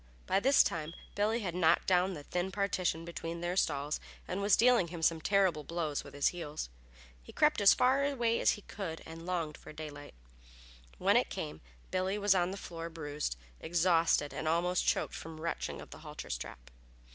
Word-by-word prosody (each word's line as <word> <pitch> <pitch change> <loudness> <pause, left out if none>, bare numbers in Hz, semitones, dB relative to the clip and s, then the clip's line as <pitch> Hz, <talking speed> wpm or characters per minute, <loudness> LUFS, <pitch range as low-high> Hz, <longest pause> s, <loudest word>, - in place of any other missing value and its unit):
By 190 - +2
this 270 +6 +6
time 165 0 -3 0.2
Billy 215 +3 +1
had 180 -5 -3
knocked 170 -1 +3
down 185 0 +3
the 145 - -8
thin 180 +5 -2
partition 185 -4 0
between 170 0 -5
their 175 +1 -2
stalls 150 -4 0 0.3
and 185 +2 -2
was 200 +1 +5
dealing 240 -6 +5
him 170 -1 -7
some 165 0 +3
terrible 190 -5 +2
blows 160 -2 -2
with - - -12
his 145 - +3
heels. 155 - -5 0.5
He - - -13
crept 300 -7 +3
as 200 - +8
far 265 +2 +3
away 240 -5 +1
as - - +4
he 210 - -9
could 175 -6 -6
and 165 +1 -9
longed 170 -4 -2
for - - -12
daylight. 150 - -9 0.8
When - - +4
it - - +2
came 75 +1 -5 0.3
Billy 185 +2 0
lay 205 -1 +4
on 175 0 +1
the 195 - -5
floor 170 -3 -6
bruised, 150 - -4 0.2
exhausted 165 -3 +2
and 155 - -3
almost 175 +3 +1
choked - - +1
from 160 0 -7
the 155 - -10
wrenching 170 - -3
of - - -11
the - - -9
halter - - -8
strap. - - -6
170 Hz, 195 wpm, -32 LUFS, 160-195 Hz, 0.8 s, as